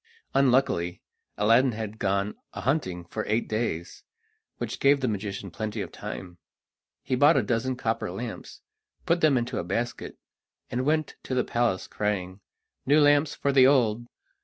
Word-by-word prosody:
Unluckily, 125 -10 +2 0.4
Aladdin 115 +5 +4
had 110 0 -6
gone 100 +1 0 0.2
a - - -6
hunting 95 - -1
for 110 +5 -4
eight 110 +3 0
days, 110 -7 -3 0.5
which - - -4
gave 140 +1 +4
the 130 - -1
magician 100 -3 -4
plenty 110 +3 -4
of - - -4
time. 95 -4 -8 0.6
He 130 - -3
bought 145 +5 +5
a - - +3
dozen 125 +2 -1
copper 115 -6 -2
lamps, 110 +6 -7 0.4
put 170 +1 +2
them 150 -4 +4
into 120 0 -2
a - - -2
basket, 115 +7 -3 0.5
and 125 +3 -1
went 155 0 0
to 130 - -4
the 125 - +2
palace, 120 -6 0
crying: 95 -3 -2 0.4
"New 145 +3 +4
lamps 145 0 +4
for 140 -1 -1
old!" 120 -4 +2
115 Hz, 155 wpm, -27 LUFS, 100-135 Hz, 0.6 s, bought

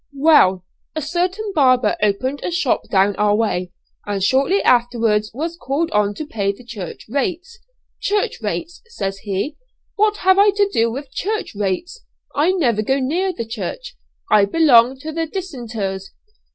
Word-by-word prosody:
"Well, 230 - +4 0.3
a 315 - -2
certain 365 +7 -2
barber 255 - +3
opened 255 +7 0
a - - -2
shop 340 -7 0
down 195 0 +3
our 210 0 +3
way, 185 -5 -1 0.4
and 200 -2 -2
shortly 270 - +3
afterwards 230 -3 +2
was 325 +7 -4
called 310 +1 -2
on 205 -1 +1
to 310 - -5
pay 200 -8 -1
the 200 +5 -14
church 215 -7 -8
rates. 355 - -3 0.4
'Church 410 0 -1
rates,' 340 0 -4
says 195 - -4
he, 205 +10 -3 0.4
'what 425 0 +2
have 375 +1 +5
I 410 +1 +6
to 405 -1 +3
do 230 +1 +2
with 270 +2 -7
church 430 +3 -3
rates? 205 - -3 0.3
I 310 +6 +2
never 245 - +1
go 265 +5 +1
near 335 +9 0
the 230 -10 -5
church. 245 - -6 0.4
I 210 -2 +6
belong 260 -1 +4
to 315 - -5
the 325 +1 -2
dissenters.' 230 - -5
260 Hz, 160 wpm, -20 LUFS, 210-345 Hz, 0.4 s, I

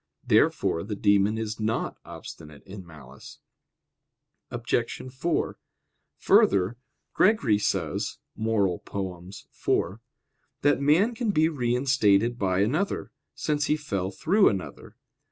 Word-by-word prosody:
Therefore 85 - +2
the 105 0 -5
demon 100 +2 +2
is 110 -1 -4
not 110 +1 -1
obstinate 75 -2 -11
in 100 0 -10
malice. 70 -5 -13 1.1
Obj. 120 0 -2
4: 160 +6 -2 0.6
Further, 100 +4 +3 0.4
Gregory 140 - +3
says - - -2 0.2
(Moral. 105 -5 0
iv) 95 +1 -4 0.6
that 145 -1 +3
man 170 +12 +3
can 230 -1 -2
be 160 -5 +3
reinstated 120 -4 +1
by 95 -1 +1
another, 155 - -1 0.2
since 150 -1 -1
he 150 - +2
fell 100 -11 -3
through 195 - +3
another. 95 -3 -6
110 Hz, 105 wpm, -26 LUFS, 95-145 Hz, 1.1 s, Further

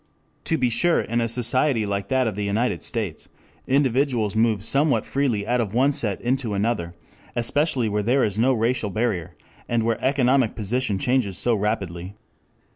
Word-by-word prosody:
To 160 - +2
be 125 -4 +1
sure 175 +8 +3
in 120 +1 -1
a 115 - 0
society 120 +1 +1
like 100 -1 -3
that 130 +2 +1
of 110 -4 -2
the 105 - -3
United 110 +5 0
States, 110 -9 -4 0.4
individuals 130 -5 +1
move 110 -3 +2
somewhat 145 +4 +2
freely 125 -7 -1
out 125 +2 +1
of 110 -1 -4
one 135 +4 +4
set 115 -9 -2
into 120 -3 -1
another, 100 -5 -1 0.4
especially 130 +1 +1
where 105 0 0
there 125 +6 +2
is 105 0 -1
no 125 +4 +4
racial 115 -2 0
barrier 100 -5 -2 0.3
and 120 -1 +1
where 115 -1 -1
economic 130 -3 +2
position 110 0 -1
changes 115 -3 0
so 120 - +1
rapidly. 100 -3 -3
115 Hz, 170 wpm, -23 LUFS, 105-130 Hz, 0.4 s, one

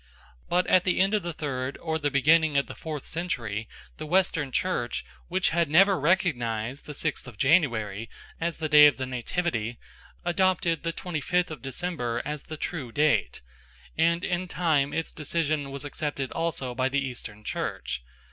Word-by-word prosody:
But 180 +1 +3
at 185 - +4
the 185 - +1
end 195 +2 +3
of 210 - +2
the 175 - -3
third 135 -4 -3
or 160 -1 -2
the 145 -1 +1
beginning 150 +2 +4
of 140 - +3
the - - -8
fourth 155 -4 -6
century 115 - -3 0.3
the 155 - -6
Western 165 -5 +2
Church, 125 -7 -1 0.2
which 185 +1 +1
had 170 -2 +2
never 190 +4 +5
recognised 135 - 0
the 150 - -6
sixth 155 -3 -2
of 120 -4 -11
January 115 - +2 0.3
as 170 0 -1
the 160 - -2
day 150 -1 +9
of 145 - +2
the 130 - -2
Nativity, 125 -2 -2 0.5
adopted 175 -2 +2
the 165 - -1
twenty 165 -2 -4
fifth 180 +2 +1
of 155 - -7
December 135 -4 -2
as 150 -1 -3
the 155 - -8
true 150 -7 -4
date, 150 +4 +2 0.5
and 170 +2 +2
in 185 0 -1
time 155 -5 +1
its 165 - -2
decision 155 -2 -1
was 140 +1 -6
accepted 145 -2 -3
also 165 -6 -2
by 130 +1 +1
the 140 +1 0
Eastern 110 -4 -8
Church. 60 -10 -3
150 Hz, 175 wpm, -27 LUFS, 130-170 Hz, 0.5 s, day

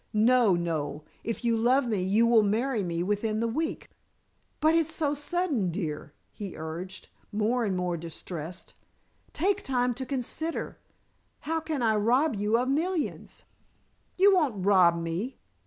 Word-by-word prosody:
No, 225 -2 +4
Noel, 155 -3 -3 0.2
if 230 +1 -4
you 230 -1 +3
love 250 +4 +3
me 210 -5 0
you 200 +5 +3
will 230 -1 +5
marry 225 +3 0
me 170 -1 -2
within 210 +3 -1
the 230 - +1
week." 315 +8 -3 0.7
"But 315 +1 +4
it's 325 -1 +2
so 300 -2 0
sudden, 295 - -1
dear," 160 -4 -4 0.2
he 200 -4 -7
urged, 170 +4 -7 0.2
more 225 +4 +1
and 190 -3 -1
more 180 -1 -1
distressed. 170 +1 -7 0.6
"Take 400 +5 +1
time 250 -2 0
to 260 +3 -5
consider. 280 +5 -3 0.6
How 325 +2 -1
can 310 -5 -3
I 220 -2 +3
rob 250 +7 +2
you 210 +3 +1
of 250 +2 0
millions?" 320 +4 -2 0.7
"You 395 +2 +6
won't 260 - +1
rob 180 -4 +5
me. 170 +10 -3
225 Hz, 150 wpm, -28 LUFS, 185-275 Hz, 0.7 s, You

